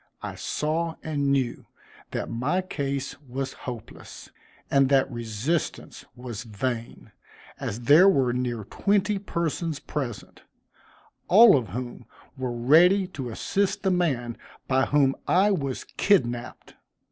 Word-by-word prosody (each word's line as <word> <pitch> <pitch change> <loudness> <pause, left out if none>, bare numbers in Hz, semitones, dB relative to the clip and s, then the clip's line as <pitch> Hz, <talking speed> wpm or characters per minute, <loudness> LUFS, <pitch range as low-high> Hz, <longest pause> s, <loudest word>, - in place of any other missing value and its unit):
I - - -4
saw 160 +2 -2
and 145 -3 0
knew 130 -3 -1 0.4
that - - -3
my 145 +11 -1
case 140 -5 -4
was 135 0 -5 0.2
hopeless, 120 -3 -10 0.4
and 135 -1 +4
that 135 -1 +3
resistance 120 +7 -3
was 120 -3 -7
vain, 115 +1 -5 0.5
as 110 +4 -4
there 150 +10 +7
were 130 -9 +2
near 120 -3 -2
twenty 200 - 0
persons 170 -4 -2
present, 120 -8 -6 0.9
all 215 +1 +8
of 125 -5 0
whom 120 +5 -7 0.3
were 130 -2 -3
ready 165 +11 +5
to 135 -9 -6
assist 195 - -1
the 190 - +2
man 135 -10 -1 0.3
by 130 0 +2
whom 140 -2 +3
I 195 +4 +4
was 140 -9 -2
kidnapped. 120 - 0
135 Hz, 125 wpm, -26 LUFS, 120-170 Hz, 0.9 s, all